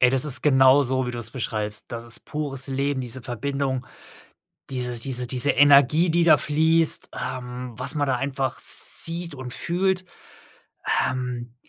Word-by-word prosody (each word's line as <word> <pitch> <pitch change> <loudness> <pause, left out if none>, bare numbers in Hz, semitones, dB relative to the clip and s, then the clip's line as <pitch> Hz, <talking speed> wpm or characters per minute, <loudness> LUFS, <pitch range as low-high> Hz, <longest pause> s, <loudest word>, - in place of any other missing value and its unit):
Ey, 125 - +5
das 135 +2 +2
ist 140 -3 0
genau 135 -1 +5
so, 130 -1 -1
wie - - -3
du 120 - -6
es 115 0 -6
beschreibst. 105 -4 -4
Das 115 0 -7
ist 115 -1 -5
pures 140 -3 -3
Leben, 135 0 -1
diese 125 +1 -7
Verbindung, 130 +1 -3 0.8
dieses 125 -2 -4
diese 125 0 -3
diese 130 +3 0
Energie, 145 +4 +5
die 170 +1 +2
da 155 -3 +6
fließt, 160 +2 +1
ähm, 125 -1 -6
was 130 +4 -1
man 145 -2 0
da 130 - 0
einfach 135 0 -3
sieht 170 -1 +3
und 130 -2 -7
fühlt. 185 +2 -1 1.0
Ähm, 125 -2 -5
130 Hz, 160 wpm, -23 LUFS, 125-145 Hz, 1.0 s, da